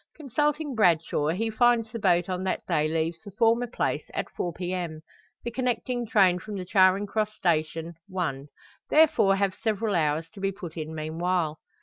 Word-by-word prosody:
Consulting 295 +1 -1
Bradshaw, 170 -8 +2
he 215 +8 0
finds 230 0 +3
the 230 - -5
boat 175 -3 +2
on 185 0 -3
that 190 - -2
day 150 0 +1
leaves 160 +1 -1
the 205 - -9
former 230 +4 +2
place 240 - -2
at - - -3
4 175 - -3
p.m.; 175 -2 -4 0.4
the 235 - -3
connecting 245 -1 -1
train 190 -4 +4
from 210 +2 -7
the 185 - -5
Charing 190 +1 +4
Cross 215 +1 -2
station, 165 -1 -1
1. 145 -7 -3 0.4
Therefore 290 -11 +5
have 195 -1 +1
several 215 0 -1
hours 155 -1 +1
to 205 - -11
be 195 0 0
put 185 -4 -9
in 160 -1 -5
meanwhile. 160 +1 -1
185 Hz, 175 wpm, -27 LUFS, 165-225 Hz, 0.4 s, Therefore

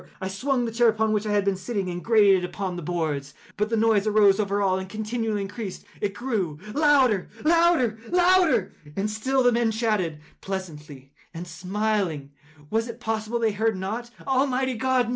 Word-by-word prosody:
I 190 -1 -4
swung 250 +5 -1
the 230 - -3
chair 235 +1 +3
upon 220 0 +1
which 215 0 -1
I - - -1
had 205 -1 +2
been 200 -1 +1
sitting, 195 0 -3
and 175 0 -5
grated 210 -4 +5
it - - -1
upon 185 -1 -4
the 175 - -5
boards, 150 -4 -3 0.2
but 210 +2 -1
the 225 - 0
noise 220 -2 +3
arose 205 -2 +4
over 200 -1 0
all 190 -2 +1
and 190 0 -7
continually 220 0 -2
increased. 200 -1 -7 0.2
It 200 -1 -2
grew 205 - -2 0.2
louder—louder—louder! 295 - +3 0.2
And 200 +1 -1
still 260 +5 0
the 245 - +5
men 235 -1 +2
chatted 215 -8 -1 0.2
pleasantly, 150 -8 -7 0.2
and 170 +2 -6
smiled. 185 -3 -2 0.4
Was 225 +1 0
it 235 0 -8
possible 220 0 -2
they 225 -2 +1
heard 220 0 0
not? 220 +6 -4 0.2
Almighty 265 -1 +1
God! 250 0 +1
215 Hz, 175 wpm, -25 LUFS, 190-235 Hz, 0.4 s, grated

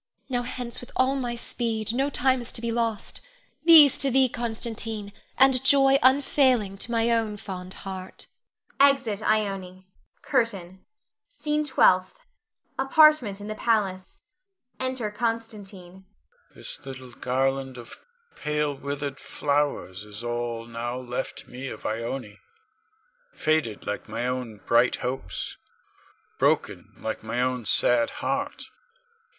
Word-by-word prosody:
Now 245 -2 0
hence 245 -1 -5
with 245 - -12
all 260 +1 +2
my 245 -3 -2
speed, 225 -2 -3
no 270 +3 +1
time 260 -2 +2
is 240 - -7
to 230 - -5
be 235 -1 -2
lost! 230 -2 -2 0.4
These 315 -5 +8
to 275 - +3
thee, 260 0 +4
Constantine, 225 -3 -4 0.2
and 265 -1 +5
joy 270 0 +5
unfailing 260 -6 +3
to - - -7
my 230 0 +2
own 225 -2 0
fond 185 -2 -7
heart. 190 -1 -7 0.5
[Exit 270 -7 +4
Ione. 195 -4 -1 0.4
CURTAIN. 195 -9 -1 0.5
SCENE 300 -11 -1
TWELFTH. 190 - +3 0.6
[Apartment 270 -7 +5
in 205 - -7
the 215 - -3
palace. 200 -5 -1 0.6
Enter 255 -4 -2
Constantine.] 210 -5 -4
Con. 190 +1 -17 0.5
This - - -4
little 130 -2 -9
garland 135 +1 -1
of 120 -1 -10 0.3
pale, 150 -1 -1
withered 140 0 -4
flowers 140 -10 -1
is 105 +2 -8
all 120 -1 -3
now 120 +1 -4
left 125 0 -5
me 130 +2 -7
of 110 - -8
Ione, 115 -1 -4 1.0
faded 155 -9 0
like 105 - -4
my 115 +3 -3
own 125 -5 -4
bright 120 +2 +4
hopes, 130 +2 -4 0.8
broken - - +1
like 110 - -4
my 110 +2 -3
own 125 -2 -1
sad 120 -1 +4 0.2
heart. 280 +1 -2
200 Hz, 125 wpm, -26 LUFS, -, 1.0 s, These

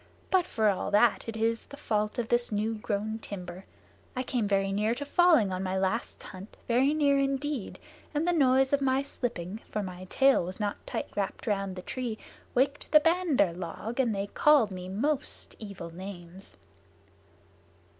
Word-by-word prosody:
"But 370 -2 +3
for 220 -8 +1
all 200 -2 0
that, 210 +2 +3
it 225 - -4
is 225 +1 0
the 280 - -11
fault 210 -6 -1
of 240 -2 -1
this 240 -1 +1
new 215 +2 0
grown 215 0 -3
timber. 185 -3 -7 0.5
I 255 - -1
came 245 -4 -1
very 195 -1 +1
near 210 +4 +1
to 285 - -5
falling 300 - +4
on 185 - -2
my 190 0 -1
last 190 +5 -2
hunt 190 +2 -11
very 255 +4 +3
near 285 -2 +3
indeed 275 -3 -2 0.3
and 310 +3 -1
the 355 - +3
noise 265 -3 +3
of 285 - +3
my 265 0 +2
slipping, 220 -7 -4
for 210 - -2
my 185 -1 -7
tail 270 +3 +4
was 185 +4 -6
not 205 -1 -1
tight - - -3
wrapped 200 +2 -3
around 195 -3 -1
the 185 - -7
tree, 245 -4 -4 0.4
waked 280 +3 +1
the 305 - +9
Bandar 325 - +2
log, 185 +7 -6
and 235 -5 +2
they 195 0 -1
called 260 0 +4
me 185 -1 -6
most 275 +9 0
evil 195 -6 -8
names." 185 0 -9
220 Hz, 175 wpm, -29 LUFS, 195-270 Hz, 0.5 s, the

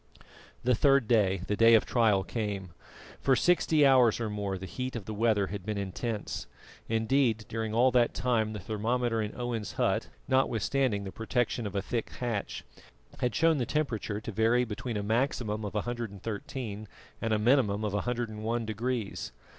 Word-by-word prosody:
The 125 +1 +3
third 135 0 +4
day 100 -5 +3
the 105 - -1
day 115 +2 +7
of 110 - +4
trial 110 -5 +3
came. 100 -5 -4 0.5
For 135 - +3
sixty 160 -2 +3
hours 125 -5 +5
or 110 -2 -2
more 100 -2 -2
the 95 - -7
heat 130 +5 -5
of 110 -5 -5
the 110 - -5
weather 105 -2 +2
had 100 -3 -5
been 105 +1 -3
intense; 100 +3 -4 0.4
indeed, 115 0 +1
during 110 -1 -3
all 125 +3 +5
that 120 -1 +3
time 110 -4 +1
the 105 - -5
thermometer 115 +3 -1
in 105 -1 -4
Owen's 120 -3 -3
hut, - - 0 0.2
notwithstanding 130 -3 +1
the 95 - -6
protection 115 0 -1
of 100 - -8
a 100 - 0
thick 115 +1 -2
hatch, 115 -5 -3 0.6
had 125 - 0
shown 160 -2 +3
the 125 - 0
temperature 115 -8 -1
to 110 - -6
vary 115 +4 +3
between 115 +1 -4
a 100 - -2
maximum 110 -1 0
of 105 0 -5
113 110 0 -4 0.3
and 115 - -1
a 110 - +3
minimum 110 -2 +2
of 105 -2 -1
101 115 0 -2
degrees. 110 0 -3
115 Hz, 170 wpm, -29 LUFS, 105-125 Hz, 0.6 s, day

